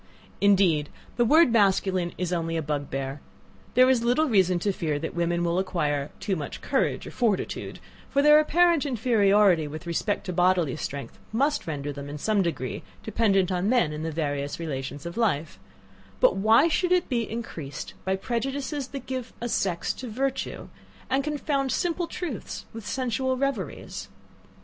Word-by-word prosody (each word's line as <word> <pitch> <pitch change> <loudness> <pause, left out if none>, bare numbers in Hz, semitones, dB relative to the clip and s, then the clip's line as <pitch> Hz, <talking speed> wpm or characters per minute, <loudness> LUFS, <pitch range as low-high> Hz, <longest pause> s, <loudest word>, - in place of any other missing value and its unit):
Indeed 185 -7 +4 0.3
the 240 - +3
word 310 +2 +6
masculine 190 -4 +2
is 180 -1 -2
only 165 -1 -1
a 160 - -1
bugbear: 140 -2 -3 0.5
there 255 +1 +7
is 260 -3 +3
little 250 +7 +3
reason 190 -7 +3
to 200 +4 0
fear 160 -6 -2
that 160 +2 -4
women 170 0 0
will 170 +1 +1
acquire 150 -6 -1
too 190 0 -1
much 150 -4 -5
courage - - 0
or - - -7
fortitude; 225 -6 -1 0.3
for 280 - +2
their 300 +1 +8
apparent 335 0 +3
inferiority 205 - +3
with 155 +4 -8
respect 170 +5 -1
to 180 - -3
bodily 175 -4 +2
strength, 140 -2 -6
must 275 - 0
render 145 -2 -3
them, 140 0 -7
in 145 - -5
some 210 +6 +1
degree, 145 -8 -3 0.2
dependent 200 -4 +2
on 180 +2 0
men 230 -12 +2
in 150 - -5
the 160 0 -3
various 145 -2 -2
relations 140 -2 -5
of 170 +3 -6
life; 165 -10 0 0.6
but - - +5
why 220 +9 +5
should 355 +2 +1
it 360 -1 +3
be 235 -4 -1
increased 165 -11 -6
by 190 0 0
prejudices 265 +6 -3
that 275 -2 -7
give 260 -2 -5
a 240 - -3
sex 185 -7 0
to 255 - -8
virtue, 265 +4 -3 0.4
and 270 +1 +2
confound 285 -2 -1
simple 350 -1 0
truths 330 - -5
with 225 -2 -8
sensual 260 0 -1
reveries? 255 - -3
195 Hz, 165 wpm, -26 LUFS, 165-255 Hz, 0.6 s, their